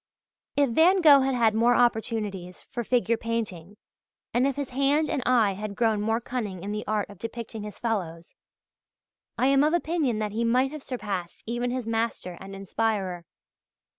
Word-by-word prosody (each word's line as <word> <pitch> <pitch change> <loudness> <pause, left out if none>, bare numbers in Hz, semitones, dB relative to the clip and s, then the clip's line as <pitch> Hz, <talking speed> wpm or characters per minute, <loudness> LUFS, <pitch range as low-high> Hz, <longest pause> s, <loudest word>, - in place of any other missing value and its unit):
If 285 -4 +3
Van 355 +9 +5
Gogh 295 -4 +8
had 265 -1 +1
had 230 -3 +3
more 235 +2 +4
opportunities 220 -6 -1
for 240 - -3
figure 235 -1 +1
painting, 210 -5 -4 0.6
and 250 +3 +3
if 275 - -1
his 285 -2 -4
hand 280 +4 +2
and 285 - -1
eye 235 -5 +4
had 205 +1 -6
grown 220 -3 +1
more 225 +2 +1
cunning 215 -7 -5
in 200 - -4
the 210 0 -3
art 210 -1 0
of 200 - -14
depicting 230 -1 -6
his 210 0 -8
fellows, 175 -8 -3 1.0
I 245 - +2
am 275 +1 +4
of 310 +3 +3
opinion 315 -8 0
that 215 -1 -2
he 225 +3 -1
might 250 +3 +2
have 305 -1 -7
surpassed 205 -10 -5
even 240 +2 -2
his 250 -1 -3
master 225 -5 -2
and 195 0 -8
inspirer. 195 -3 -2
230 Hz, 175 wpm, -26 LUFS, 205-255 Hz, 1.0 s, Gogh